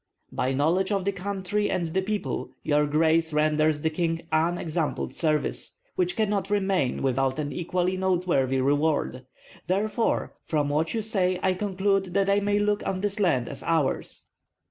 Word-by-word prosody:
"By 130 - -1
knowledge 165 +9 +1
of 195 -2 0
the 200 - +2
country 200 +2 -2
and 175 - 0
the 190 - +2
people 210 +2 -3
your 150 0 +2
grace 160 +2 +2
renders 155 0 +2
the 160 - +1
king 165 0 -1
unexampled 165 0 0
service, 155 -2 -1 0.2
which 360 -2 0
cannot 205 -3 0
remain 190 -11 0
without 135 0 +1
an 145 -1 -2
equally 180 +1 -1
noteworthy 175 -8 +1
reward. 145 -2 0 0.4
Therefore 210 +5 0
from 150 -3 0
what 155 +7 0
you 220 - -1
say 185 -4 +1
I 190 - +3
conclude 195 -1 0
that 200 0 +3
I 200 - +4
may 205 0 +1
look 205 0 +1
on 185 -1 -2
this 205 +1 -1
land 135 -12 +2
as - - -6
ours." 160 -5 0
180 Hz, 160 wpm, -26 LUFS, 155-200 Hz, 0.4 s, I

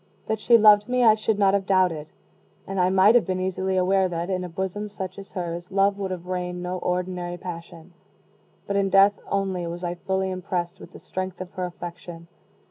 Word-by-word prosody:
That 220 -1 -2
she 235 +2 +5
loved 210 0 +6
me 250 0 +2
I 220 -2 +7
should 215 0 0
not 195 -1 +4
have 200 -1 0
doubted; 180 -5 +2 0.6
and 195 0 -4
I 180 0 +3
might 190 +3 +5
have 240 -3 +4
been 185 -1 -1
easily 190 0 -1
aware 190 +1 +2
that, 170 +2 -3
in 185 -1 -1
a 180 - -5
bosom 190 +4 -4
such 190 -1 -6
as 195 0 -12
hers, 175 -2 -4
love 200 +1 +2
would 195 -1 -2
have 180 -2 -5
reigned 180 -1 -4
no 180 +1 -3
ordinary 180 -1 -2
passion. 170 -1 -9 0.7
But 200 - -1
in 195 -1 +2
death 195 +1 +5
only 190 -3 -1
was 170 +1 -6
I 175 0 -1
fully 190 +1 -2
impressed 185 0 -3
with - - -13
the - - -11
strength 185 -1 -5
of 185 0 -7
her 185 -2 -3
affection. 175 -1 -9
185 Hz, 210 wpm, -24 LUFS, 180-195 Hz, 0.7 s, I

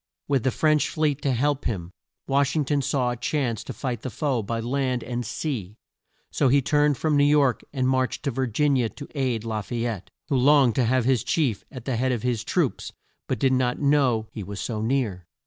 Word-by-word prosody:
With 140 -3 +2
the 130 - +1
French 155 +2 +2
fleet 150 -2 0
to 140 - +1
help 140 +3 0
him, 90 -7 -3 0.3
Wash 140 +1 +1
ing 150 -2 +1
ton 145 0 +1
saw 125 -2 0
a - - -3
chance 120 -2 -1
to - - -5
fight 125 -4 -4
the 130 - -4
foe 130 -2 -1
by 115 +2 -3
land 125 +1 -1
and 120 -1 -3
sea, 115 - -4 0.6
so 140 - +2
he 140 +3 +5
turned 145 0 +2
from 155 -2 +1
New 145 - +4
York 145 -3 +3
and 130 -2 0
marched 130 +1 0
to 140 - 0
Vir 130 +1 -1
gin 140 +5 +2
i - - +1
a 115 -2 +1
to 145 - -10
aid 130 -6 -1
La 110 -2 -2
fay 115 +3 -3
ette, 110 -6 -4 0.2
who 135 - +2
longed 135 -2 +5
to 125 +2 +1
have 125 +1 +2
his 130 -4 +2
chief 135 -11 0
at 130 -5 -9
the 130 -4 -1
head 130 +2 +1
of 120 -3 -2
his 120 -3 0
troops - - -1 0.4
but - - -1
did 135 -1 +2
not 125 -1 +1
know 135 -6 +2
he 110 - -6
was 100 +1 -6
so 110 -3 -3
near. 110 -7 -1
130 Hz, 230 wpm, -25 LUFS, 115-140 Hz, 0.6 s, he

